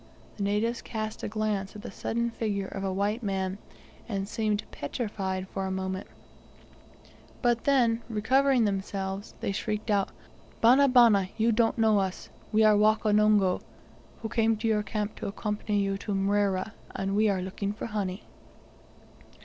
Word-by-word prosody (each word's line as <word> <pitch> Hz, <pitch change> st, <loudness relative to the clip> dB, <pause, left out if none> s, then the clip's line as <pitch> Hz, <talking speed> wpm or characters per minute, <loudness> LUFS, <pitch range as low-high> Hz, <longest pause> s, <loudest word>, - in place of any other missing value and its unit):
The -, -, -6 dB
natives 210 Hz, +4 st, 0 dB
cast 215 Hz, -1 st, -5 dB
a -, -, -3 dB
glance 210 Hz, -2 st, -2 dB
at 210 Hz, -, -9 dB
the -, -, -6 dB
sudden 235 Hz, +1 st, -2 dB
figure 205 Hz, -4 st, -2 dB
of 195 Hz, 0 st, -6 dB
a 195 Hz, -, -1 dB
white 205 Hz, +5 st, -1 dB
man, 195 Hz, -2 st, -2 dB, 0.5 s
and 195 Hz, -2 st, -2 dB
seemed 215 Hz, -1 st, -1 dB
petrified 190 Hz, -, -3 dB
for 195 Hz, 0 st, -3 dB
a -, -, -2 dB
moment, 190 Hz, 0 st, -3 dB, 1.4 s
but 240 Hz, -1 st, +2 dB
then, 240 Hz, -5 st, +3 dB
recovering 255 Hz, +3 st, +3 dB
themselves, 195 Hz, 0 st, -3 dB
they -, -, -1 dB
shrieked 215 Hz, +2 st, -2 dB
out, 200 Hz, -2 st, +2 dB, 0.5 s
"Bana, 260 Hz, +5 st, +6 dB
bana, 230 Hz, -7 st, +5 dB
you 230 Hz, +1 st, +3 dB
don't 225 Hz, +1 st, +2 dB
know 220 Hz, -2 st, +4 dB
us. 190 Hz, -1 st, -3 dB, 0.2 s
We 220 Hz, +1 st, +4 dB
are 215 Hz, -1 st, +6 dB
Wakonongo, 210 Hz, -2 st, +3 dB, 0.6 s
who -, -, -1 dB
came 225 Hz, 0 st, +2 dB
to 220 Hz, +2 st, -2 dB
your 215 Hz, -1 st, +2 dB
camp 210 Hz, +1 st, -3 dB
to -, -, -4 dB
accompany 210 Hz, +1 st, -2 dB
you 195 Hz, 0 st, -1 dB
to 205 Hz, -, -3 dB
Mrera, 195 Hz, 0 st, +1 dB, 0.2 s
and 195 Hz, +1 st, -1 dB
we 215 Hz, +1 st, +4 dB
are 190 Hz, -2 st, 0 dB
looking 195 Hz, +2 st, -3 dB
for 210 Hz, -, -6 dB
honey." 200 Hz, -3 st, -3 dB
210 Hz, 155 wpm, -28 LUFS, 195-225 Hz, 1.4 s, Bana